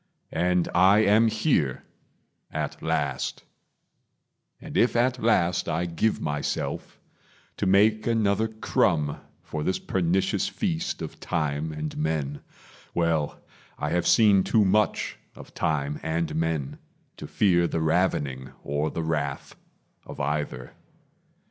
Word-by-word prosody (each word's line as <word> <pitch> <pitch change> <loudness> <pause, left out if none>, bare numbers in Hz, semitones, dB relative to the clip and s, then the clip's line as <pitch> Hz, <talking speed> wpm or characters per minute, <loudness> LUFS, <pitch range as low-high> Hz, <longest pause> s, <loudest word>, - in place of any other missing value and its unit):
And 90 +1 +1
I 100 +3 +5
am 110 +3 +5
here, 110 - +1 0.7
at - - -4
last; - - -2 1.2
and - - -9
if 120 - +3
at 125 +1 +2
last 90 -6 +2
I 85 - 0
give 90 +6 0
myself 75 -1 -3 0.6
to 100 - -1
make 105 +3 +4
another 110 -1 +2
crumb 90 -8 0 0.3
For 75 - -5
this 95 +5 0
pernicious 95 +2 0
feast 175 - -2
of 80 - -8
time 75 -2 -2
and 75 0 -5
men 75 -2 -2 0.5
Well, 80 -3 0 0.4
I - - -2
have 85 -1 +1
seen 105 -4 +5
too 110 +1 +3
much 105 +2 +1 0.2
of - - -13
time 75 -3 -1
and 80 +1 -2
men 80 -4 -2 0.4
To - - -8
fear 85 -4 +3
the 85 - -2
ravening 75 -6 0
or 75 +2 -1
the 85 - -4
wrath 75 -4 -3 0.5
of - - -9
either. 75 -3 -3
85 Hz, 125 wpm, -26 LUFS, 75-105 Hz, 1.2 s, I